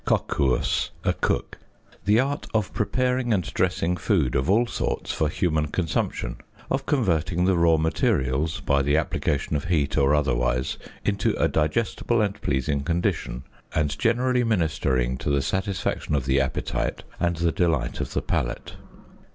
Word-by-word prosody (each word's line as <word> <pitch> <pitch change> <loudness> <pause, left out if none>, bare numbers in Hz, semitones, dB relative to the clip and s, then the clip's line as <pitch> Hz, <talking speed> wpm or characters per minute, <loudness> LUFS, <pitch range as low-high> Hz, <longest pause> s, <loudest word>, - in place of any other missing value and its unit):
coquus, 65 -4 +1
a - - +2
cook), - - -2 0.5
the 105 +2 +4
art 140 +3 -1
of 105 -3 0
preparing 125 +2 0
and 95 -4 +2
dressing 90 +2 +1
food 85 - +1
of 65 +5 0
all 115 +5 +4
sorts - - -2
for 80 - 0
human 80 -1 0
consumption, 80 +1 -2 0.3
of 135 0 -1
converting 90 - +1
the 95 0 +3
raw 85 -1 +4
materials, 80 - 0
by 70 0 +2
the 70 +2 +2
application 75 -2 -1
of 70 - -2
heat 80 -5 +1
or 70 +1 +4
otherwise, 65 -3 0 0.3
into 100 -1 +1
a - - +2
digestible 115 +8 0
and 105 -1 -1
pleasing 70 +1 0
condition, 75 -5 -1 0.3
and 75 -2 0
generally 125 +2 +2
ministering 75 - 0
to - - -3
the 70 -1 +3
satisfaction 95 -1 -1
of 70 -3 -1
the 70 0 +3
appetite - - -2 0.2
and 85 0 +1
the 85 0 +1
delight 80 -9 0
of - - -5
the - - -1
palate. - - -2
80 Hz, 150 wpm, -25 LUFS, 70-100 Hz, 0.5 s, the